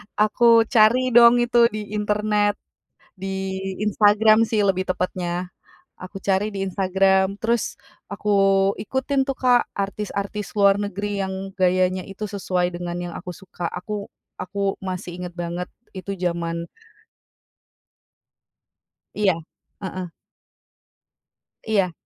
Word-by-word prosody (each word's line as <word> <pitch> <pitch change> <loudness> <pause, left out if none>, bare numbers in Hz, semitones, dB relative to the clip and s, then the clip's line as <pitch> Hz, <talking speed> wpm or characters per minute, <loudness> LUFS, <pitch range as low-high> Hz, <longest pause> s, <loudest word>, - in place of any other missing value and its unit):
aku 230 +2 +5
cari 245 +2 +4
dong 240 0 +7
itu 240 0 +4
di 210 -1 -5
internet, 210 0 +1 0.6
di 190 0 -4 0.3
Instagram 215 +1 +5
sih 220 - +2
lebih 185 -1 +1
tepatnya. 180 -1 -2 0.5
Aku 190 +1 -9
cari 200 +2 0
di 195 - -3
Instagram 190 0 +2
terus 230 0 0 0.3
aku 205 +1 -5 0.5
ikutin 265 +4 -1
tuh 275 - -1
Kak, 245 -2 +3
artis-artis 200 +1 -4
luar 200 -1 +4
negeri 205 0 -3
yang 190 0 -4
gayanya 185 0 +2
itu 195 +2 -8
sesuai 180 -3 -1
dengan 175 0 -4
yang 175 -1 -5
aku 180 -1 -8
suka, 180 -2 -6
aku 200 +4 -5 0.3
aku 195 +1 -2
masih 185 -1 -5
inget 180 -1 -6
banget 175 +1 -4 0.3
itu 195 +1 -5
zaman 170 -1 -3 2.5
Iya 205 -3 +3 0.5
heeh. 185 -1 -5 1.6
Iya. 200 -5 +1
195 Hz, 110 wpm, -23 LUFS, 185-210 Hz, 2.5 s, dong